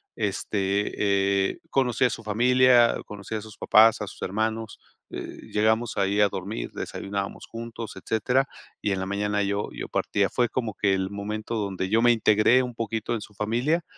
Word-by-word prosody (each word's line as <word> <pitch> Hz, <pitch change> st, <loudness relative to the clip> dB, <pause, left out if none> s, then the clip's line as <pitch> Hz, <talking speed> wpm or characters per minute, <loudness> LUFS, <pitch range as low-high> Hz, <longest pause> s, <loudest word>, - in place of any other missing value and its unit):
este, 100 Hz, -1 st, 0 dB
eh, -, -, -13 dB
conocí 130 Hz, -2 st, +1 dB
a -, -, +3 dB
su 115 Hz, -, -6 dB
familia, 120 Hz, +2 st, +4 dB
conocí 105 Hz, +1 st, -7 dB
a 110 Hz, -, -3 dB
sus 110 Hz, 0 st, -12 dB
papás, 110 Hz, +1 st, +5 dB
a 105 Hz, -, -3 dB
sus -, -, -11 dB
hermanos, 110 Hz, +2 st, -2 dB, 0.3 s
eh, -, -, -7 dB
llegamos 110 Hz, +2 st, +1 dB
ahí 100 Hz, +1 st, +1 dB
a 105 Hz, -, +5 dB
dormir, 100 Hz, +3 st, -5 dB
desayunábamos 100 Hz, 0 st, -5 dB
juntos, 115 Hz, -1 st, -7 dB
etcétera. 125 Hz, +7 st, +1 dB, 0.3 s
Y 105 Hz, -, 0 dB
en 95 Hz, -, -1 dB
la 95 Hz, -, -2 dB
mañana 105 Hz, +1 st, 0 dB
yo 100 Hz, +1 st, -1 dB
yo -, -, -6 dB
partía. 100 Hz, -1 st, 0 dB
Fue 120 Hz, -1 st, +1 dB
como 115 Hz, -4 st, -2 dB
que 100 Hz, -1 st, +1 dB
el 95 Hz, 0 st, -2 dB
momento 105 Hz, +3 st, -4 dB
donde 95 Hz, -3 st, -2 dB
yo 110 Hz, +3 st, +3 dB
me 120 Hz, 0 st, +6 dB
integré 110 Hz, +3 st, +4 dB
un 125 Hz, -1 st, -5 dB
poquito 115 Hz, 0 st, -3 dB
en 115 Hz, -, -2 dB
su 105 Hz, -, -11 dB
familia, 120 Hz, -, 0 dB
105 Hz, 180 wpm, -26 LUFS, 100-115 Hz, 0.3 s, me